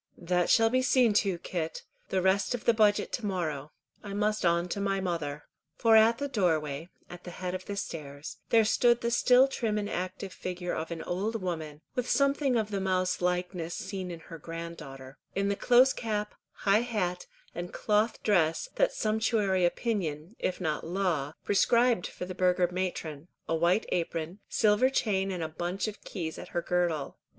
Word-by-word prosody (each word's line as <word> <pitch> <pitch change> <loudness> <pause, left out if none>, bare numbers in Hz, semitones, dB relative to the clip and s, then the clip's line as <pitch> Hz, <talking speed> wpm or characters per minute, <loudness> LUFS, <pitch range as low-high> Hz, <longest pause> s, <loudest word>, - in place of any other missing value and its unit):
"That 180 0 0
shall 225 0 +5
be 255 +1 +3
seen 255 -4 +4
to, 195 -4 -1
Kit. 170 -2 -4 0.3
The 190 -1 0
rest 195 +5 +2
of 235 - -8
the 235 - +5
budget 210 -2 +3
to 235 - -3
morrow. 155 -7 -3 0.3
I 200 -1 -7
must 210 +1 0
on 170 0 +2
to 200 - -3
my 195 -1 0
mother." 160 -6 -3 0.3
For 225 -1 +4
at 225 +1 +6
the 285 +2 -2
doorway, 160 - 0 0.2
at 180 0 -11
the - - -7
head 180 +1 -5
of 185 0 -5
the 200 - -4
stairs, 145 -6 -6
there 225 -2 +5
stood 240 +2 +3
the 235 - 0
still 250 +2 +5
trim 225 -5 -1
and 205 -1 -1
active 185 0 -4
figure 180 -1 -4
of 160 - -3
an 170 -1 -5
old 210 +6 -2
woman, 160 -5 -4
with 250 -2 -2
something 275 -1 +2
of 215 -1 -1
the 200 -1 -1
mouse 185 -1 0
likeness 180 -1 -1
seen 190 -2 -5
in 170 -2 -7
her 165 0 -10
grand 165 +1 -6
daughter, 135 -2 -10 0.2
in 200 +1 +1
the 200 - +1
close 250 +4 +5
cap, 210 -2 -3 0.2
high 200 +2 +2
hat, 190 -7 -2 0.3
and 175 +1 -5
cloth 215 +1 0
dress, 175 - +2
that - - +3
sumptuary 215 -4 +1
opinion, 175 -3 -2
if 185 - -2
not 155 -4 -2
law, 165 -5 -1
prescribed 235 0 +3
for - - -7
the 185 - -6
burgher 180 0 +2
matron, 170 -4 -4 0.2
a - - 0
white 170 +6 +2
apron, 165 +1 -2
silver 215 +4 +3
chain 195 -7 0
and 160 -4 -4
bunch 180 +4 -1
of 215 - -7
keys 165 -5 -5
at - - -8
her - - +2
girdle. 170 -5 -1
185 Hz, 185 wpm, -29 LUFS, 170-215 Hz, 0.3 s, at